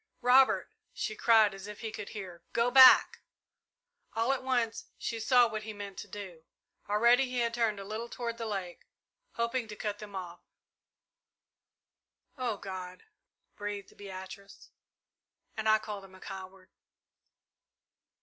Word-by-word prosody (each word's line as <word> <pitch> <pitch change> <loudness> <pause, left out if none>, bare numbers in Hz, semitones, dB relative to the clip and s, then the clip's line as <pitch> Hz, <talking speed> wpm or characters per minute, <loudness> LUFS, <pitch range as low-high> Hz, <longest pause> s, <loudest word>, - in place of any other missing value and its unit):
"Robert!" 260 +2 +4 0.2
she 215 - -3
cried, 220 -2 +5
as 195 +1 -9
if 210 0 -9
he 220 -2 -4
could 205 - -7
hear. 185 -5 -8
"Go 235 +1 +2
back!" 260 0 +8 1.0
All 230 +4 +2
at 270 - -3
once 245 -4 -1
she 230 - -4
saw 245 +2 +5
what 215 -1 -4
he 215 0 -7
meant 200 -1 -8
to - - -7
do. 185 -6 -9 0.5
Already 235 +5 +4
he 250 -1 -5
had 235 -1 +1
turned 225 -4 0
a - - -6
little 215 +4 -5
toward 235 -1 -5
the 230 - -3
lake, 190 -4 -5 0.5
hoping 235 0 -1
to 210 - -8
cut 210 -1 -4
them 205 -2 -9
off. 175 -2 -6 2.0
"Oh 245 -6 -2
God!" 185 -2 -8 0.5
breathed 205 -1 -6
Beatrice. 195 0 -10 0.8
"And 220 0 0
I 215 - +6
called 210 -2 -7
him 190 -1 -14
a - - -15
coward!" 190 -1 -10
215 Hz, 145 wpm, -31 LUFS, 195-235 Hz, 2.0 s, back